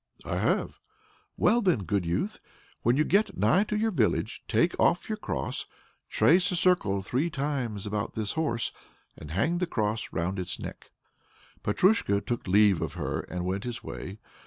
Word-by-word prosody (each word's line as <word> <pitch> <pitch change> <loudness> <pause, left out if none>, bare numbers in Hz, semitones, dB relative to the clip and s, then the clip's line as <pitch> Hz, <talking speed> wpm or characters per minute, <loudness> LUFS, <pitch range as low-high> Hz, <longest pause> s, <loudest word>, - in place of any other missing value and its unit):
"I - - -2
have." - - 0 0.6
"Well 235 +3 +4
then, 180 - +2
good 95 0 -1
youth, 90 +5 -1 0.4
when 120 +3 +3
you 155 - +4
get 195 +2 +1
nigh 195 +4 +3
to 210 - -2
your 220 +1 +1
village, 125 - 0
take - - +2
off - - +3
your - - -1
cross, - - -3 0.4
trace 180 +3 +4
a - - 0
circle 170 - +2
three 135 - 0
times 135 - -3
about 105 +1 -3
this 105 -2 -2
horse, 120 -8 0 0.4
and 75 - -10
hang 150 - 0
the 180 - 0
cross 110 -6 -2
round 90 +3 -2
its 90 - -3
neck." - - -8 0.7
Petrusha 105 - +3
took 120 0 -4
leave 100 -2 +4
of 80 - -3
her - - -3
and 90 +1 -5
went 95 +2 -2
his 120 -1 -5
way. 95 +3 -7
115 Hz, 170 wpm, -28 LUFS, -, 0.7 s, Well